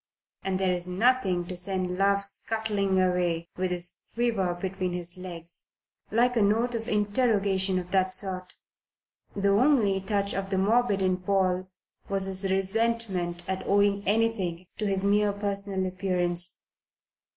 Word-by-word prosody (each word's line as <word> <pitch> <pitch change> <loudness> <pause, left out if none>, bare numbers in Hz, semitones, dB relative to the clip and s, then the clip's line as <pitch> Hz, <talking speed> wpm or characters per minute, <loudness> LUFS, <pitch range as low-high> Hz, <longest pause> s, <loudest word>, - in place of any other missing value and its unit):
And 190 -1 -2
there 190 -1 +2
is 175 0 0
nothing 190 -2 +2
to 180 - -6
send 180 0 -1
love 200 +1 +2
scuttling 200 -1 -1
away 175 -2 0
with 185 0 -1
his 180 0 -4 0.2
quiver 220 -7 0
between 185 0 -3
his 175 0 -5
legs 170 -2 -3 0.3
like 245 +3 +2
a 230 - +3
note 225 +4 +2
of 230 0 -3
interrogation 205 -3 +1
of 180 0 -5
that 185 -1 +2
sort. 185 -2 -1 0.8
The 200 0 +1
only 205 -3 +3
touch 200 0 -1
of 195 0 -3
the 195 - 0
morbid 205 0 +2
in 185 -1 +2
Paul 185 -1 0 0.4
was 195 -1 +1
his 195 0 -1
resentment 195 -3 0
at 190 0 -3
owing 200 0 +3
anything 200 -5 0
to 210 - 0
his 195 -1 0
mere 205 +1 +3
personal 200 -1 -2
appearance. 180 -1 0
195 Hz, 145 wpm, -27 LUFS, 185-205 Hz, 0.8 s, a